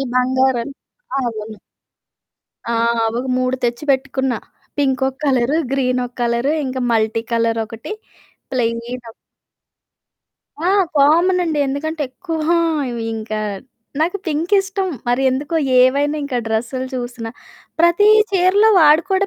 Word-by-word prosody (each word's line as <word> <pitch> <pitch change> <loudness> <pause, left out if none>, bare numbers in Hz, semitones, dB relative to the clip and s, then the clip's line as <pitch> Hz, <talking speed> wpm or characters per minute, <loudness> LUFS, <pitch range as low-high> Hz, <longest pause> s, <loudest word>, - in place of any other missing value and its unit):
ఈ - - -1
బంగారం 255 -1 +2 0.6
అవును. 215 -2 -5 1.1
ఆ! - - 0 0.4
అవొక 240 +3 -3
3 255 0 0
తెచ్చి 240 +4 -1
పెట్టుకున్న. 265 -1 0 0.5
పింకొక 265 -1 +1
కలరు, 265 +1 +2 0.2
గ్రీనొక 255 -2 0
కలరు, 235 +3 +1
ఇంకా 260 0 -3
మల్టీ 220 0 +1
కలరొకటి, 230 - -1 0.6
ప్లెయినొక 235 -1 -3 1.6
ఆ! - - +3 0.3
కామనండి. 330 +3 +3
ఎందుకంటే 300 +3 -3
ఎక్కువ 330 +2 -5 0.5
ఇవి 235 -1 -4
ఇంకా 215 0 -4 0.6
నాకు 340 +5 +1
పింకిష్టం 380 +5 0 0.2
మరి 245 +2 +1
ఎందుకో 290 +6 -2 0.2
ఏవైనా 280 +4 +3
ఇంకా 260 -3 -2
డ్రెస్సులు 235 +4 -2
చూసినా, 240 -2 -5 0.5
ప్రతి 345 +5 +4 0.2
చీరలో 390 +3 +4
వాడు 305 +1 +6
కూడా 385 +1 +2
260 Hz, 105 wpm, -19 LUFS, 235-315 Hz, 1.6 s, వాడు